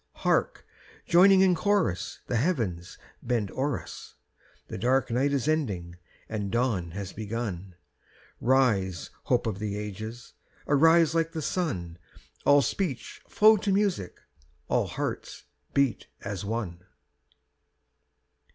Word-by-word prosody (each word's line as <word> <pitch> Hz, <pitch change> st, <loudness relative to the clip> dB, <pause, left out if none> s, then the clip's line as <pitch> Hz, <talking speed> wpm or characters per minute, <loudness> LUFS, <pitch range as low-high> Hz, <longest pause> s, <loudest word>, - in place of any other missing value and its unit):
Hark! -, -, +1 dB, 0.4 s
joining 190 Hz, +2 st, +6 dB
in 190 Hz, -1 st, +5 dB
chorus 190 Hz, -, 0 dB
The 125 Hz, -, -1 dB
heavens 105 Hz, -, -1 dB, 0.2 s
bend 115 Hz, -5 st, -1 dB
o'er 135 Hz, -5 st, -1 dB
us' 80 Hz, -, -11 dB, 0.5 s
The -, -, -6 dB
dark 130 Hz, +1 st, +1 dB
night 135 Hz, +4 st, +1 dB
is 140 Hz, -1 st, 0 dB
ending 100 Hz, -, -1 dB, 0.3 s
and 105 Hz, -3 st, -3 dB
dawn 115 Hz, -8 st, 0 dB
has 100 Hz, -1 st, -6 dB
begun; 100 Hz, -4 st, -5 dB, 0.6 s
Rise, 110 Hz, -, +1 dB
hope -, -, +1 dB
of 105 Hz, -4 st, -2 dB
the 105 Hz, -1 st, -3 dB
ages, 110 Hz, +3 st, -7 dB, 0.3 s
arise 160 Hz, +2 st, +5 dB
like 165 Hz, 0 st, 0 dB
the 160 Hz, -, -3 dB
sun, 90 Hz, -, -3 dB, 0.5 s
All 145 Hz, 0 st, +6 dB
speech 155 Hz, -, -3 dB
flow 215 Hz, 0 st, +6 dB
to 200 Hz, 0 st, -1 dB
music, 195 Hz, -, 0 dB, 0.5 s
all -, -, +1 dB
hearts -, -, -5 dB, 0.3 s
beat 140 Hz, -5 st, +1 dB
as 100 Hz, -2 st, -5 dB
one! 100 Hz, -5 st, -4 dB
120 Hz, 120 wpm, -27 LUFS, 100-155 Hz, 0.6 s, joining